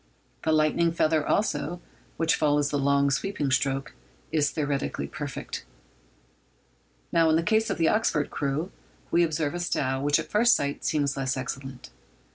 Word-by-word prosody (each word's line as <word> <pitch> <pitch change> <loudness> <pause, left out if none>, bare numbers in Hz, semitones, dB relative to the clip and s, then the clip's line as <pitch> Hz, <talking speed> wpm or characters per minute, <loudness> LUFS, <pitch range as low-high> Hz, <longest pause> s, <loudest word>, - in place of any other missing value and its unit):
The 160 - +1
lightning 155 +2 +3
feather, 155 -2 +1
also, 175 -4 0 0.4
which 165 0 +2
follows 145 -1 +2
the 145 - 0
long 140 0 +2
sweeping 145 -2 -1
stroke, 135 +1 0 0.4
is 150 -2 +2
theoretically 145 -3 -2
perfect. 145 -4 -6 1.5
Now, 165 -1 +4
in 155 - +4
the 165 - +2
case 220 +5 +2
of - - -1
the 165 -1 +3
Oxford 165 -9 +1
crew, 145 +6 -2 0.4
we 170 - +4
observe 155 -2 0
a 175 - -3
style 135 -6 -1
which 145 +1 +3
at - - -6
first 235 +3 +5
sight 140 0 -2
seems 145 -3 0
less 135 0 -1
excellent. 130 0 -6
150 Hz, 155 wpm, -26 LUFS, 140-165 Hz, 1.5 s, first